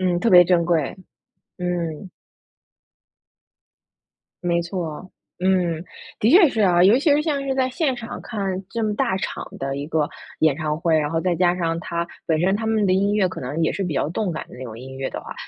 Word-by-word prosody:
嗯， 180 -2 +1
特 230 - +2
别 180 -1 +9
珍 170 -1 +3
贵， 165 -5 0 0.6
嗯。 175 -1 -3 2.3
没 170 -1 +1
错， 170 -1 -5 0.3
嗯。 180 -3 +1 0.4
的 220 - +3
确 340 +2 +7
是 230 - -3
啊。 180 -3 +4
尤 205 +6 +6
其 295 +4 +1
是 295 - +3
像 300 -3 -1
是 265 - 0
在 260 -1 +1
现 265 0 0
场 235 -1 -7
看 220 -4 -5 0.3
这 230 -1 -2
么 215 -1 0
大 235 -2 0
场 - - -4
的 135 0 -3
一 140 +1 -5
个 155 -2 0 0.3
演 155 -3 +4
唱 155 -2 -2
会， 165 0 +2
然 150 -1 -1
后 165 +1 -1
再 180 0 +1
加 175 +1 +2
上 165 -2 -1
它， 170 0 -3 0.2
本 160 - +2
身 190 +2 +2
他 220 +2 -3
们 220 -2 +2
的 185 - +2
音 200 +2 +2
乐 210 -3 +3
可 180 - -7
能 140 +6 -3
也 - - +2
是 200 - -3
比 170 - -3
较 135 +2 0
动 180 +1 -2
感 155 - -5
的 - - -12
那 130 - -7
种 110 -2 -8
音 130 +2 -9
乐 135 0 -3
的 - - -6
话， - - -8
175 Hz, 235 characters per minute, -22 LUFS, 160-210 Hz, 2.3 s, 别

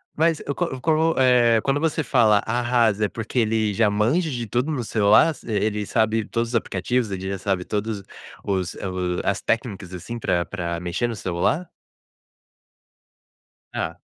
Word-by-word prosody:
Mas 160 0 +2
eu 140 - -2
co 175 - -1
eu 130 -6 -5
co 160 +3 +2
eh, 125 -3 +5
quando 140 +1 +1
você 160 0 0
fala 110 -7 +4
"arrasa" 120 -3 +2
é - - -2
porque 115 +4 -3
ele 110 -2 +1
já 110 +1 +3
manja 120 - +1
de 120 -4 -3
tudo 125 +8 -1
no 135 -5 -2
celular, 110 +8 +4
ele 105 -1 -1
sabe 110 -1 +1
todos 115 +2 -2
os 120 - -4
aplicativos, 115 +3 0
ele 95 -1 -4
já 100 -1 -3
sabe 95 -2 -1
todos 105 -1 -3 0.4
os 95 -3 -2
o 90 -2 -3
as 100 0 0
técnicas, 105 -6 -2
assim, 95 +7 -6
pra 85 -5 0
pra 85 -4 -4
mexer 90 +7 -1
no 115 - -4
celular? 95 - -1 2.0
Tá. - - -4
110 Hz, 165 wpm, -23 LUFS, 100-125 Hz, 2.0 s, eh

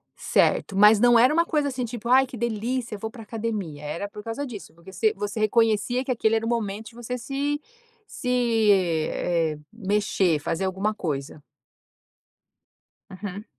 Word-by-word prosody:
Certo, 195 - +1
mas 210 +1 +7
não 240 0 +6
era 255 +6 +5
uma 335 +1 +3
coisa 295 -3 0
assim, 250 -2 -3
tipo: 235 0 -7
"Ai 260 +2 +6
que 250 - -9
delícia 235 +1 -2
eu - - -9
vou 220 - -4
para 225 -1 -11
academia". 210 -9 -4
Era 165 +7 -4
por 210 +1 -10
causa 230 +6 -4
disso, 215 -10 -9
porque 170 +3 -14
você 215 +4 +2
você 205 +2 -4
reconhecia 225 +3 +2
que 265 - -2
aquele 225 -2 +2
era 225 0 0
o - - -1
momento 220 -2 -2
de 230 - -20
você 240 +1 -5
se 280 +4 -2 0.5
se, 250 - -8 0.8
eh, 165 -3 0
mexer, 200 -5 +1
fazer 165 +5 -2
alguma 190 +3 -1
coisa. 145 -6 -4 1.7
Uhum. 200 +2 -7
220 Hz, 170 wpm, -25 LUFS, 195-240 Hz, 1.7 s, mas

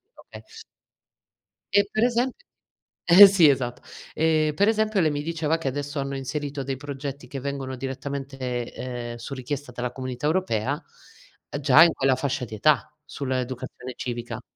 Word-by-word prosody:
okay. - - -13 1.3
E 200 0 +4
per 220 - 0
esemp 245 +1 +1 0.7
eh 190 +4 +10
sì, 180 -6 +6
esatt 125 -2 -1 0.3
E, 155 -1 +2
per 200 +5 +3
esempio, 215 -3 +1
lei 155 -2 +2
mi 145 0 -2
diceva 160 0 -1
che 160 - -5
adesso 145 +2 -3
hanno 140 0 -3
inserito 140 +1 -4
dei 135 -1 -3
progetti 140 -1 -6
che 135 0 -6
vengono 135 -1 -4
direttamente, 135 -2 -4
ehm, 120 -2 -5
su 120 +4 -7
richiesta 135 0 -5
dalla 125 0 -3
Comunità 130 +2 -4
Europea, 155 - 0 0.8
già 145 +3 +7
in 170 - +5
quella 135 -2 +2
fascia 130 -1 -2
di 110 - -8
età, 150 +4 +2
sull'educazione 130 -2 -5
civica. 120 -1 -5
140 Hz, 150 wpm, -25 LUFS, 130-155 Hz, 1.3 s, eh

